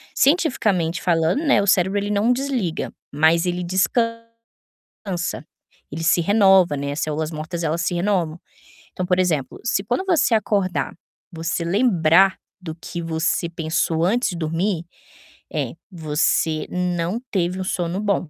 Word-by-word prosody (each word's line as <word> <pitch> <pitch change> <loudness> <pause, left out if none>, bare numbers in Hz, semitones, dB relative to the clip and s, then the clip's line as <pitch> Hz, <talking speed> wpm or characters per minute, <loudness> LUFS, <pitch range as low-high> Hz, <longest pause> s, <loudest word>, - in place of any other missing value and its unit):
Cientificamente 215 - +2
falando, 165 - +1
né, 280 -8 +4
o 200 - -2
cérebro 190 +1 +3
ele 205 0 -3
não 210 +4 +2
desliga, 250 - -2 0.2
mas 160 +4 +3
ele 180 0 -1
descansa, 230 +5 -1 1.5
ele 160 +3 -5
se 170 +1 +3
renova, 190 -4 +4
né. 140 0 -3
As 145 - -4
células 155 +1 -2
mortas, 160 +2 -5
elas 160 +2 -1
se 175 0 -1
renovam. 175 -3 0 0.5
Então, 185 - -3
por 180 0 +1
exemplo, 160 -7 0
se 200 -4 0
quando 245 - -1
você 340 -9 +2
acordar, 200 -4 0 0.4
você 165 0 -3
lembrar 190 -2 +4 0.2
do 160 -3 -6
que 170 +1 -7
você 165 +1 -1
pensou 165 -1 -1
antes 235 +7 +1
de - - -5
dormir, 165 +2 -1 0.7
eh, - - -2 0.2
você 155 -1 0
não 180 +2 -1
teve 180 -1 -1
um - - -4
sono 175 0 -2
bom, 200 -5 0
180 Hz, 145 wpm, -22 LUFS, 165-205 Hz, 1.5 s, né